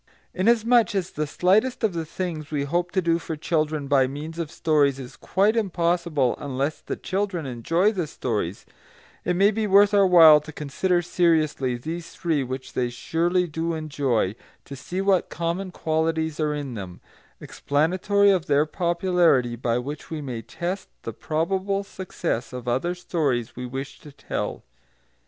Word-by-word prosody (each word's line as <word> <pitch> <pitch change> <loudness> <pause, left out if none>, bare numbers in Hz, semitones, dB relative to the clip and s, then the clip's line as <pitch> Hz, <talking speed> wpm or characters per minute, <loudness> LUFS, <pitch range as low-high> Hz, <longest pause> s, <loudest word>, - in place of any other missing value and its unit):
Inasmuch 230 +2 +3
as 190 -2 -1
the 155 0 -3
slightest 215 - +2
of 215 -4 +2
the 165 -1 -3
things 160 -4 -4
we 145 -2 -1
hope 175 +5 -1
to 185 -1 +1
do 165 0 +2
for 165 -1 -5
children 155 -2 -1
by 135 -2 +4
means 155 +5 -7
of 165 -3 -3
stories 145 -4 +2
is 130 -2 -9
quite 200 +5 +1
impossible 170 - +1
unless 140 +1 -3
the - - -4
children 190 -4 -2
enjoy 165 - +1
the 180 -7 -2
stories, 105 - -3 0.6
it 180 - 0
may 200 +3 +4
be 215 0 -1
worth 200 +1 +5
our 200 -1 +5
while 160 -4 +8
to 155 - -10
consider 175 +5 -1
seriously 155 -7 +1
these 165 +7 -6
three 160 -5 0
which 130 +1 -6
they 125 -1 0
surely 170 +8 0
do 165 0 -3
enjoy, 140 -10 0 0.3
to 140 - -8
see 180 +8 -4
what 195 -2 +2
common 170 +3 -3
qualities 160 -1 -1
are 150 -1 0
in 140 -3 -5
them, 95 -5 -7 0.4
explanatory 185 +7 +1
of 185 -4 0
their 145 +1 +3
popularity, 170 -7 +2
by 120 0 -1
which 140 +5 -6
we 160 - -4
may 125 -6 -5
test 175 - -5
the - - -5
probable 190 +5 -1
success 180 - -4
of 125 -1 -7
other 135 +9 0
stories 145 -10 -1
we 125 0 -5
wish 135 +3 -6
to 150 - -13
tell. - - -4
160 Hz, 165 wpm, -24 LUFS, 140-180 Hz, 0.6 s, while